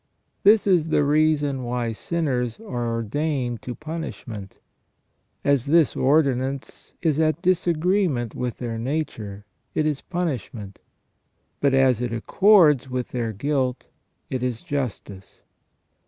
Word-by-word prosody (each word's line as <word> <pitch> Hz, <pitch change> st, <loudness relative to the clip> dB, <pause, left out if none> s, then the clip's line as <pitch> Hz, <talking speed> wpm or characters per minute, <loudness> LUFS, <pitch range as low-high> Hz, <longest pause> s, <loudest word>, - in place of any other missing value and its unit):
This 210 Hz, +1 st, +5 dB
is 180 Hz, -5 st, +3 dB
the 155 Hz, -, +2 dB
reason 145 Hz, -2 st, +2 dB
why 120 Hz, -1 st, -2 dB
sinners 125 Hz, -3 st, -2 dB
are 120 Hz, -, -4 dB
ordained 120 Hz, +2 st, -2 dB
to 125 Hz, -, -6 dB
punishment. 140 Hz, -, -7 dB, 0.9 s
As 140 Hz, -3 st, +2 dB
this 160 Hz, 0 st, +4 dB
ordi 140 Hz, 0 st, +3 dB
nance 135 Hz, +2 st, -6 dB
is 155 Hz, -3 st, +2 dB
at 155 Hz, +1 st, +1 dB
disagreement 175 Hz, -, +1 dB
with 125 Hz, -2 st, -3 dB
their 115 Hz, -2 st, -4 dB
nature, 115 Hz, -7 st, -4 dB, 0.3 s
it 155 Hz, -, +1 dB
is 150 Hz, -3 st, -1 dB
punishment; 125 Hz, -, -4 dB, 0.8 s
but 140 Hz, -2 st, +3 dB
as 130 Hz, -3 st, +3 dB
it 120 Hz, -2 st, -2 dB
accords 150 Hz, -, +4 dB
with 125 Hz, -1 st, -3 dB
their 120 Hz, -3 st, -2 dB
guilt, 130 Hz, +2 st, -2 dB, 0.4 s
it 130 Hz, -, -3 dB
is 125 Hz, -3 st, -2 dB
justice." 110 Hz, -8 st, -5 dB
135 Hz, 125 wpm, -24 LUFS, 120-155 Hz, 0.9 s, This